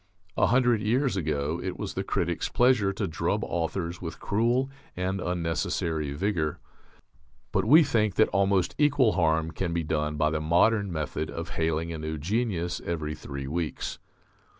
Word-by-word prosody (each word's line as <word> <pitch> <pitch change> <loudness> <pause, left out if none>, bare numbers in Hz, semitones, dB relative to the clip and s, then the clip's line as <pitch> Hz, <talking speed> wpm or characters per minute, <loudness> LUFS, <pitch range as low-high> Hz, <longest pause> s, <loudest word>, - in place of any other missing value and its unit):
A - - +3
hundred 120 0 +3
years 120 +3 +1
ago 80 -1 -1
it 95 -1 -4
was - - -4
the - - -2
critic's 85 0 -1
pleasure 120 -5 +3
to 95 - -2
drub 80 - -1
authors 85 +1 -3
with 85 -2 -6
cruel 120 +5 +1 0.3
and 95 +1 -1
unnecessary 80 -3 -1
vigour. 80 -2 -1 0.9
But 95 0 +1
we 155 +8 +8
think 110 -9 +1
that 110 - +5
almost 95 -2 +2
equal 145 -6 +4
harm 80 -3 +1
can 85 -1 -2
be 85 -1 0
done 75 -1 -1
by 75 0 +2
the 75 0 -1
modern 100 +6 +3
method 75 -1 -3
of 85 +1 -5
hailing 80 +1 -1
a 80 - -5
new 80 0 -4
"genius" 90 0 -1
every 80 -3 -3
three 70 -3 -6
weeks. 80 +2 -3
85 Hz, 160 wpm, -27 LUFS, 80-105 Hz, 0.9 s, we